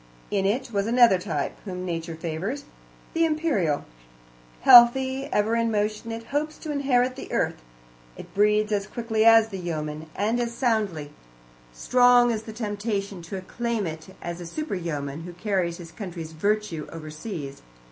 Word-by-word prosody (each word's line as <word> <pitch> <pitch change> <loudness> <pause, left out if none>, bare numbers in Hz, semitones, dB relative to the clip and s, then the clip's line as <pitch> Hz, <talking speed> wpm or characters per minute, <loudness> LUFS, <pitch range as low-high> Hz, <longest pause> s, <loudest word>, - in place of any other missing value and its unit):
In 195 -1 +1
it 245 +4 -1
was 200 +1 0
another 235 -5 +5
type, 160 -7 -3
whom 185 -2 -5
Nature 165 -1 -4
favours 175 - -4 0.5
the 330 - +2
Imperial. 305 - +1 0.8
Healthy, 260 +3 +7
ever 215 +2 +2
in 230 0 +1
motion, 215 +1 -1
it 225 0 -5
hopes 305 +1 -1
to 310 - -6
inherit 260 -3 +1
the 270 - -9
earth. - - -1 0.6
It - - -11
breeds 210 +1 +3
as 205 -1 0
quickly 225 -2 -1
as 225 -1 +7
the 195 -3 -6
yeoman, 155 -2 -4
and 220 +4 0
as 235 -1 -2
soundly; 210 - 0 0.6
strong 245 - +4
is 220 -2 -2
the 220 - -9
temptation 205 -3 -3
to 170 +4 -6
acclaim 230 +3 -3
it 160 +3 -7
as 170 0 -5
a 175 - -7
super 305 - -4
yeoman, 150 -5 -4
who 175 +1 -8
carries 180 -3 -1
his 170 -2 -10
country's 170 -6 -7
virtue 190 -1 -1
overseas. 155 -1 -7
205 Hz, 155 wpm, -25 LUFS, 170-235 Hz, 0.8 s, Healthy